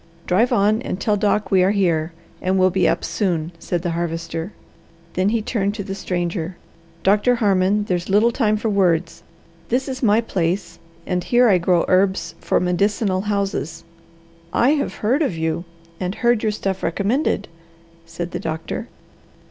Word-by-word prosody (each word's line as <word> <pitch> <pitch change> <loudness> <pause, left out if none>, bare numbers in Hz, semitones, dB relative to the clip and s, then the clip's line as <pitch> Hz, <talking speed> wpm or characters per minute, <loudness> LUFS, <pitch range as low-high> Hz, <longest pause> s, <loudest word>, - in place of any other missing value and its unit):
"Drive 215 +7 +2
on 210 +3 +3
and 185 - -4
tell 210 +2 +1
Doc 210 +1 0
we 190 -1 +5
are 185 - +4
here, 175 -5 +1 0.3
and 185 +1 +1
will 185 0 +4
be 190 +1 +2
up - - -1
soon," 170 -5 -1
said 175 0 -3
the 175 - -1
Harvester. 165 +1 -3 0.6
Then 185 +2 +1
he 220 0 0
turned 205 -3 -1
to 205 - -4
the 195 - -5
stranger. 175 -2 -3 0.5
"Doctor 210 +5 +4
Harmon, 205 -2 +2
there's 180 -3 -2
little 210 +4 +4
time 215 -3 +1
for 220 - -2
words. 180 -5 +1 0.5
This 260 +3 0
is 260 -1 -5
my 220 -3 +4
place, 180 -5 -2 0.3
and 180 -1 -1
here 245 +4 +4
I 190 -5 +4
grow 175 0 +2
herbs 185 -2 +2
for - - +1
medicinal 185 +2 +1
houses." 195 -5 -2 0.7
"I 245 - +3
have 295 -2 -1
heard 260 +8 +3
of 235 - 0
you, 160 +2 -2 0.3
and 185 +1 -3
heard 240 -2 +2
your 220 - +1
stuff 195 -2 -3
recommended," 215 - 0 0.6
said 170 +1 -6
the - - -3
doctor. 160 0 -4
190 Hz, 165 wpm, -21 LUFS, 175-210 Hz, 0.7 s, we